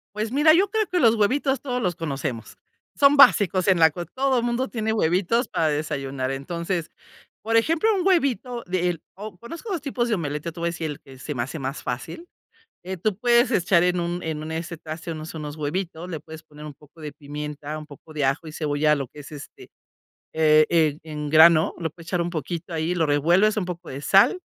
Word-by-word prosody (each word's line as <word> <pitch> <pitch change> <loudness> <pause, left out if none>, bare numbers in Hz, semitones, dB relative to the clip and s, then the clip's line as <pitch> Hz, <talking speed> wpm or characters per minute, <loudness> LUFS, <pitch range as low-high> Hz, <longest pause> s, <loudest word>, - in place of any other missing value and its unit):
Pues 215 +2 -3
mira, 295 +3 +5
yo 385 +3 +3
creo 435 -1 0
que 360 -1 0
los 230 -3 +5
huevitos 265 +5 +1
todos 250 -3 -3
los 180 -2 0
conocemos, 140 -7 -5 0.4
son 285 +1 +5
básicos 195 - +5
en 185 - +4
la 160 -1 +6
co 175 +3 -6
todo 260 -2 0
mundo 240 +2 -1
tiene 220 -1 -2
huevitos 205 +5 +1
para 160 -1 0
desayunar, 140 -3 -3
entonces, 170 +4 -3 0.5
por 225 +1 -1
ejemplo, 325 - +2
un 370 -1 -1
huevito 265 - +1
de 180 -1 0
el 170 -3 -4
o 205 -1 -9
conozco 335 - -8
2 340 -6 -2
tipos 250 -4 -2
de 220 - +2
omelette, 150 -3 -4
yo 170 - -3
te 170 - -10
voy 170 - -1
a - - +1
decir 160 -2 -4
el 145 - -9
que 135 -1 -15
se 150 +3 -6
me 120 -2 -2
hace 140 +6 -6
más 135 +1 -4
fácil. 130 - -5 0.6
Eh, 190 0 -4
tú 210 +3 -1
puedes 240 +2 +3
echar 175 -4 +3
en 180 0 +1
un 175 +1 -3
en 155 -1 -3
un, 155 - -6
este, 170 +1 -4
traste, 160 +1 -7
unos 155 0 -7
unos 150 -1 -6
huevitos, 165 +3 -4
le 160 -4 -4
puedes 160 +1 -12
poner 150 -1 -12
un 150 - -8
poco 150 +3 -21
de 150 -2 -7
pimienta, 150 +1 -6
un 155 - -8
poco 150 +1 -15
de 150 -3 -1
ajo 135 +4 -1
y - - -7
cebolla, 150 -1 +1
lo 135 -3 -4
que 150 - -14
es, 145 - -11
este, 145 -2 -11 0.6
e 155 -1 +5
e 155 -3 +2
en 150 -2 -5
grano, 160 +1 +6
lo 165 -1 -3
puedes 170 0 -15
echar 175 -1 0
un 170 0 -2
poquito 165 +2 -5
ahí, 165 +3 -1
lo 165 -2 +2
revuelves, 175 +9 +3
un 195 - 0
poco 175 -1 -7
de 135 +1 -6
sal, 195 - +4
170 Hz, 225 wpm, -24 LUFS, 150-215 Hz, 0.6 s, la